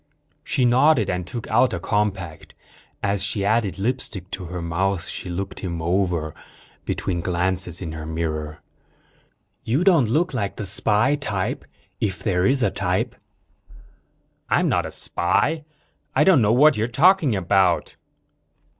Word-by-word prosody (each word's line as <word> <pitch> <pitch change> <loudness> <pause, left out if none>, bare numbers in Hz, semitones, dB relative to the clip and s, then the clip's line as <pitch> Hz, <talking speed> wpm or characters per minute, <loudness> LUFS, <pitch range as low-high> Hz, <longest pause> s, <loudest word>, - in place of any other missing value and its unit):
She 130 - 0
nodded 125 -1 +4
and 90 -1 -3
took 115 +3 -6
out 130 -7 +2
a - - -4
compact. 95 -5 -3 0.5
As 100 -1 0
she 100 0 0
added 110 -2 +1
lipstick 100 -4 -2
to 95 - -5
her 90 +1 -6
mouth, 85 +2 -1
she 90 - -5
looked 95 +3 -5
him 85 -3 -4
over, 85 -2 -1 0.5
between 85 -2 -2
glances 90 0 -1
in 80 - -5
her 80 -1 -7
mirror. 80 -1 -4 1.0
"You 130 +10 0
don't 165 - +4
look 160 +7 +1
like 100 -6 -2
the 105 - -5
spy 105 +6 +2
type. 110 -10 -2 0.3
If 95 -4 -2
there 90 0 +1
is 130 -1 +2
a - - +2
type." 100 +5 -1 1.3
"I'm - - +2
not - - +1
a - - -8
spy. 150 - 0 0.5
I - - +5
don't 185 -9 +5
know 105 -1 +3
what 145 +3 +5
you're 110 +2 0
talking 150 - +3
about." 95 -1 +1
100 Hz, 145 wpm, -22 LUFS, 90-120 Hz, 1.3 s, I